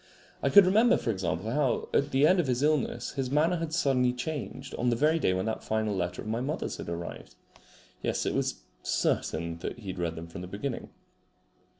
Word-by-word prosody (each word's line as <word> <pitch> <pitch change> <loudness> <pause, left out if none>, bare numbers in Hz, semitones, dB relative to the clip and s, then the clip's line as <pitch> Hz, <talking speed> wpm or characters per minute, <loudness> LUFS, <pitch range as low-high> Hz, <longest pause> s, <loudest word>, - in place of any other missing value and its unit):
I - - +2
could 200 -2 +8
remember, 220 +6 +5
for 115 - -1
example, 95 +1 -2
how 135 -2 +1
at 140 - +2
the 135 +1 +4
end 185 +4 +5
of 165 - +1
his 125 +1 0
illness 150 -5 +1
his 135 -3 -2
manner 160 +6 +2
had 165 -1 -3
suddenly 135 -7 +2
changed 130 0 -5
on 125 - 0
the 120 - +2
very 155 +6 +3
day 95 - +2
when 95 +1 -1
that 110 - -3
final 110 -2 0
letter 90 -1 -2
of - - -9
my 115 +2 -1
mother's 145 +5 -3
had - - -6
arrived. 85 -7 -6 0.7
Yes, - - -1
it - - 0
was - - -1 0.2
certain 85 +1 -1
that 90 - -5
he 105 -5 -8
had 95 - -5
read 85 -2 -1
them 80 - -6
from 85 +2 -8
the 90 - -6
beginning. 110 +7 -4
125 Hz, 215 wpm, -29 LUFS, 95-150 Hz, 0.7 s, could